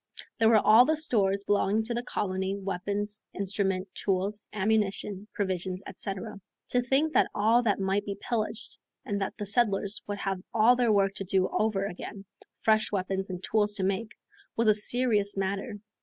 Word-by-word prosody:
There 225 -1 +5
were 225 - +6
all 220 +3 +7
the 315 +2 +1
stores 200 -10 +1
belonging 205 +1 +2
to 235 +2 -3
the 240 - -1
colony, 190 -5 -2
weapons, 200 +2 -3
instruments, 195 -1 -1
tools, 200 +2 -1
ammunition, 210 -1 -1
provisions, 185 -1 -3
etc. 200 +1 -6 0.3
To 245 - +2
think 275 +6 +1
that - - +4
all 225 +4 +4
that 210 -5 +1
might 195 +1 0
be 200 -1 -5
pillaged 220 -1 -3 0.3
and 200 -1 -2
that 195 - -3
the 205 - -4
settlers 205 -1 +1
would 205 0 -3
have 195 -2 -3
all 230 +3 +6
their 240 -2 +2
work 195 -1 +3
to - - -3
do 190 0 +1
over 210 -3 0
again, 195 +1 -7 0.3
fresh 215 -1 +2
weapons 195 0 -2
and 180 0 -6
tools 210 -1 +1
to 195 - -2
make, 195 +4 -2 0.4
was 230 0 +1
a 215 - +7
serious 210 -2 +1
matter. 195 +3 -2
205 Hz, 170 wpm, -28 LUFS, 195-220 Hz, 0.4 s, all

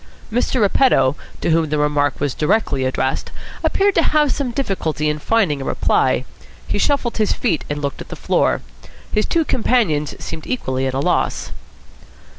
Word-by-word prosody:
Mr. 245 +2 0
Repetto, 205 - +3 0.3
to - - +1
whom 160 -1 +2
the 150 - 0
remark 145 -1 +1
was 145 -3 -1
directly 150 -5 +1
addressed, 130 0 -1 0.3
appeared 400 +1 +2
to 335 - +3
have 300 -3 +2
some 275 -1 -1
difficulty 190 - -1
in 150 0 -1
finding 175 -7 +1
a - - -3
reply. 130 -1 +1 0.4
He - - -1
shuffled 270 -1 0
his 215 -2 +2
feet, 160 - -1
and 145 0 -3
looked 140 - -3
at - - -10
the - - -6
floor. - - +1 0.5
His 215 - +1
two 330 -2 +1
companions 215 - +1
seemed 160 - -7
equally 130 - -1
at 130 - -3
a - - 0
loss. - - 0
160 Hz, 170 wpm, -19 LUFS, 145-240 Hz, 0.5 s, Repetto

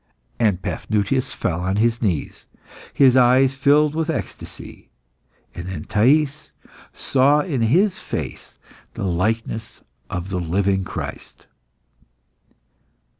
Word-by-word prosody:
'" - - -40
And 100 -5 +1
Paphnutius 115 +5 -1
fell 90 -6 -2
on 95 +2 -1
his 115 +2 +1
knees, 90 -10 -2 0.5
his 130 -3 +5
eyes 130 +1 +5
filled 145 +2 +3
with 160 +1 -2
ecstasy. 160 - -7 0.6
And 85 +1 -7
then 95 - -5
Thais 140 +7 +1 0.4
saw 140 +3 +2
in 145 -7 -2
his 175 - +2
face - - -6 0.4
the - - -4
likeness 110 +5 -2 0.3
of 90 +1 -4
the 90 -1 -2
living 95 +3 0
Christ. 95 - -7
115 Hz, 115 wpm, -21 LUFS, 95-140 Hz, 0.6 s, his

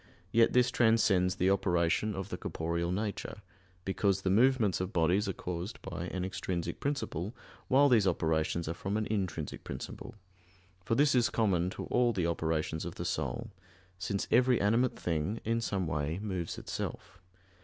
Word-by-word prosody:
Yet 115 0 +4
this 125 -1 +4
transcends 110 -7 +3
the 95 0 +2
operation 90 +2 +1
of 95 -1 -5
the - - -4
corporeal 85 +1 -2
nature; 105 +1 -4 0.4
because 95 0 +1
the 95 - +1
movements 115 -3 +3
of 95 +1 -3
bodies 90 +3 +2
are - - -1
caused 90 +5 -5
by 85 -2 -5
an 90 0 -3
extrinsic 90 -2 -3
principle, 120 - -3 0.3
while 140 +2 +5
these 115 -7 +4
operations 80 -1 0
are 80 - -1
from 95 +4 -3
an 110 - -1
intrinsic 95 -8 -3
principle; - - -7 0.7
for 115 - 0
this 145 +1 +4
is 120 -3 +3
common 95 -6 +1
to - - -6
all 120 -1 +2
the 90 -5 0
operations 80 -1 -1
of - - -6
the - - -5
soul; 115 -2 -3 0.5
since 100 +2 -2
every 125 0 +4
animate 115 +5 +2
thing, 85 +6 -1
in 115 +1 +1
some 100 -4 -1
way, 75 +1 -2
moves 95 -4 -4
itself. 90 - -6
95 Hz, 165 wpm, -31 LUFS, 85-115 Hz, 0.7 s, while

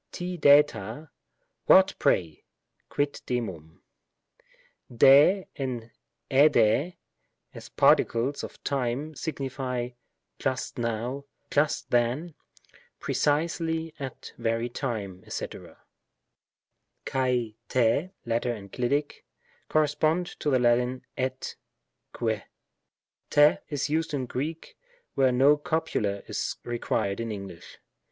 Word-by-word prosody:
ri 180 0 -3
drjra; 145 - +3 0.6
"what, 190 0 +7
pray?" 80 -4 +1 0.5
(quid 145 0 -1
demum?) 95 -11 -4 1.1
5^ 140 - +6 0.8
and^^/y, 140 +2 +4 0.6
as - - -10
particles 125 +5 +2
of - - -9
time, 135 +3 -2
signify 130 -5 -3 0.5
"just 130 -1 -2
now," 120 +4 -2 0.3
"just 150 +1 +1
then," 125 +8 +1 0.7
"pre - - -3
cisely 160 +1 0
at 135 -2 -6
that - - -11
very 115 +1 -1
time," 105 -8 -4
&c. - - -3
xal - - -12 0.8
— - - -54
Tt 125 +4 0
(latter 120 +1 0
enclitic) 125 +8 -2 0.5
correspond 155 +3 +2
to 150 - 0
the 130 - +4
Lat. 125 +1 +2 0.2
et 130 0 -3 0.3
— - - -54
que. 110 -3 0 0.9
Tt 145 +1 +5
is 145 -3 -1
used 160 0 -1
in 130 -2 -2
Greek, 150 +7 -5 0.4
where 135 -1 +3
no 135 +4 +5
copula 150 - -1
is - - -3
required 115 -4 -2
in 115 -1 -3
English. 100 -4 -9
130 Hz, 100 wpm, -27 LUFS, 115-150 Hz, 1.1 s, what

